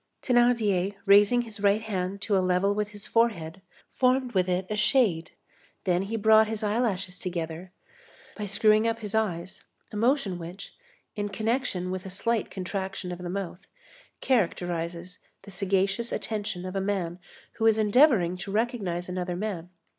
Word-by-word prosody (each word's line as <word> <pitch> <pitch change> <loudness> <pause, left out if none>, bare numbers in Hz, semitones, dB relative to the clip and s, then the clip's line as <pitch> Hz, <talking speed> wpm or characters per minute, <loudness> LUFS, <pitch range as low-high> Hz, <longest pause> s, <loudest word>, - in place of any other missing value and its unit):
Thénardier, 225 -6 +2
raising 205 +4 +6
his 220 -2 -9
right 205 +2 +2
hand 195 -2 -3
to 205 - +1
a 190 - +3
level 185 +2 +2
with 210 0 -1
his 205 -1 -9
forehead, 195 -7 0 0.3
formed 255 0 +2
with 185 -3 +1
it 180 +1 0
a - - 0
shade, 210 -7 +2 0.5
then 180 -1 +1
he 200 +4 -3
brought 220 0 +5
his 220 0 -4
eyelashes 205 -4 -1
together, 170 -1 -5 0.6
by 210 -1 -4
screwing 215 +2 +4
up 230 0 -1
his 210 -2 -6
eyes, 190 -5 -2 0.3
a - - -8
motion 220 -5 +1
which, 175 +4 -9 0.4
in 205 -1 -2
connection 215 -3 -1
with 185 0 -4
a - - -6
slight 225 +4 -1
contraction 190 -1 -4
of 175 - -6
the 180 -1 -5
mouth, 190 0 -5 0.5
characterizes 175 -6 -1 0.2
the 200 - -11
sagacious 195 +4 0
attention 205 -5 -3
of 185 +1 -6
a 195 - 0
man 185 -3 -2 0.4
who 225 - +2
is 220 -1 +4
endeavoring 215 - +4
to 195 +2 -6
recognize 205 -6 -1
another 180 -1 -3
man. 180 -3 -4
200 Hz, 160 wpm, -27 LUFS, 180-220 Hz, 0.6 s, raising